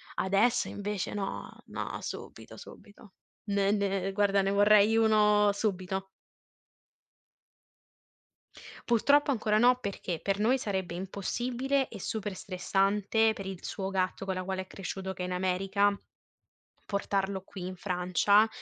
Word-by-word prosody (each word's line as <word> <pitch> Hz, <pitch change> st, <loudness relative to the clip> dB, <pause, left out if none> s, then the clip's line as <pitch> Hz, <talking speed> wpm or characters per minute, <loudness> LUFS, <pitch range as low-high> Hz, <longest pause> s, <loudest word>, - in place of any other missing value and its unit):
adesso 200 Hz, +6 st, +2 dB
invece 205 Hz, -1 st, -4 dB
no, 195 Hz, -2 st, -4 dB, 0.2 s
no, -, -, -5 dB
subito, -, -, -8 dB
subito. 205 Hz, -1 st, -14 dB, 0.4 s
Ne 200 Hz, 0 st, +2 dB
ne 195 Hz, -2 st, 0 dB
guarda, 200 Hz, -1 st, +3 dB
ne 195 Hz, -, +1 dB
vorrei 205 Hz, +2 st, +5 dB
uno 210 Hz, -2 st, +4 dB
subito. 190 Hz, -2 st, -2 dB, 2.8 s
Purtroppo 280 Hz, +5 st, +4 dB
ancora 215 Hz, -3 st, +1 dB
no 245 Hz, +2 st, +5 dB
perché 195 Hz, -6 st, -4 dB
per 195 Hz, 0 st, 0 dB
noi 245 Hz, +5 st, +3 dB
sarebbe 190 Hz, -5 st, -3 dB
impossibile 245 Hz, +9 st, -2 dB
e 210 Hz, -, -10 dB
super 205 Hz, -1 st, -4 dB
stressante 200 Hz, +4 st, +1 dB
per 195 Hz, -2 st, -7 dB
il 190 Hz, -2 st, -7 dB
suo 195 Hz, -2 st, -4 dB
gatto 190 Hz, 0 st, -1 dB
con 190 Hz, -1 st, -2 dB
la 185 Hz, -, -3 dB
quale 190 Hz, 0 st, -3 dB
è 185 Hz, -, -10 dB
cresciuto, 190 Hz, 0 st, -5 dB
che 180 Hz, -, -5 dB
è -, -, -1 dB
in 180 Hz, -, -5 dB
America, 195 Hz, +2 st, +1 dB, 0.9 s
portarlo 200 Hz, -1 st, -1 dB
qui 190 Hz, -1 st, -8 dB
in 185 Hz, 0 st, -5 dB
Francia, 185 Hz, +3 st, +3 dB
200 Hz, 130 wpm, -29 LUFS, 190-215 Hz, 2.8 s, vorrei